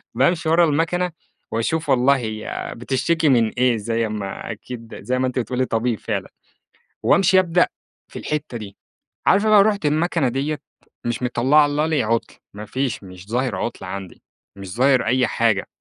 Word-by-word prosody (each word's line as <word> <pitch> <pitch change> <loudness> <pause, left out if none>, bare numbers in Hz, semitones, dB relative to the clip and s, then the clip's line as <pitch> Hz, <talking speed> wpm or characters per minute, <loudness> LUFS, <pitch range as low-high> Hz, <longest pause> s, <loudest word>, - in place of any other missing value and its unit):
بامشي 160 +5 +2
ورا 170 +1 +5
المَكَنة 165 +4 0 0.4
وأشوف 155 +9 -1
والله 135 +2 +4
هي 110 -3 -5
بتشتكي 150 +6 +1
من 115 -4 +4
إيه، 125 -1 +2
زي 115 +1 -1
أمّا 105 +1 -5
أكيد 115 +1 -9
زي 130 +1 -1
ما 130 - +1
أنتِ 125 0 -2
بتقولي 125 +1 -1
طبيب 115 -3 -1
فعلًا، - - -3 0.8
وأمشي 190 0 +5
أبدأ 175 -1 +3 0.5
في - - -6
الحِتّة 150 -5 -3
دي، 100 -2 -9 0.5
عارفة 205 +3 +4
بقى 205 -2 +7
رُحت 205 -6 0
المَكَنة 155 -2 +1
ديّة، 145 +4 -2 0.5
مش 120 +1 -2
مطلّعة 135 +5 +4
لي 150 -1 +1
عُطل، 115 +1 -1 0.2
ما 105 +1 -8
فيش 130 0 -2
مش 90 +1 -12
ظاهر 125 +2 0
عُطل 120 - -4
عندي، 95 -2 -7 0.3
مش 95 0 -8
ظاهر 130 -1 +3
أي 125 +1 +2
حاجة. 110 -4 +1
130 Hz, 160 wpm, -21 LUFS, 115-155 Hz, 0.8 s, بقى